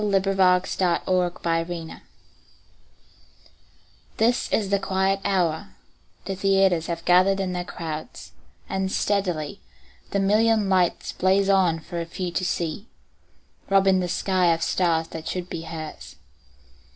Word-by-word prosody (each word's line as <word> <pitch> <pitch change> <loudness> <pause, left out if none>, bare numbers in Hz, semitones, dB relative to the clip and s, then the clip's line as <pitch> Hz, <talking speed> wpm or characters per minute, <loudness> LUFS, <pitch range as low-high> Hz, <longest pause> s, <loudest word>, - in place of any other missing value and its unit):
Sara 200 -2 +2 0.4
Teasdale 180 -1 0 0.3
Broadway 165 -1 -3 2.2
THIS 235 +2 +1
is 200 -3 0
the 200 - +3
quiet 195 0 0
hour; 180 0 -1 0.5
the 195 - -3
theaters 190 -3 +2
Have 170 -1 -4
gathered 185 +2 +4
in 185 -2 -2
their 180 0 -2
crowds, 160 -3 -7 0.4
and 190 0 -2
steadily 195 -4 -1 0.5
The 200 - 0
million 215 +1 +3
lights 185 -2 +1
blaze 195 +1 +2
on 180 -4 +3
for 170 +1 -5
few 175 +1 -5
to 180 - -2
see, 175 +3 -2 0.8
Robbing 195 -1 +4
the 180 -1 -2
sky 185 -1 +2
of 165 - -4
stars 165 -3 +1
that 160 -1 -7
should 180 -1 -3
be 165 - -4
hers. 160 -1 -8
185 Hz, 125 wpm, -24 LUFS, 170-195 Hz, 2.2 s, gathered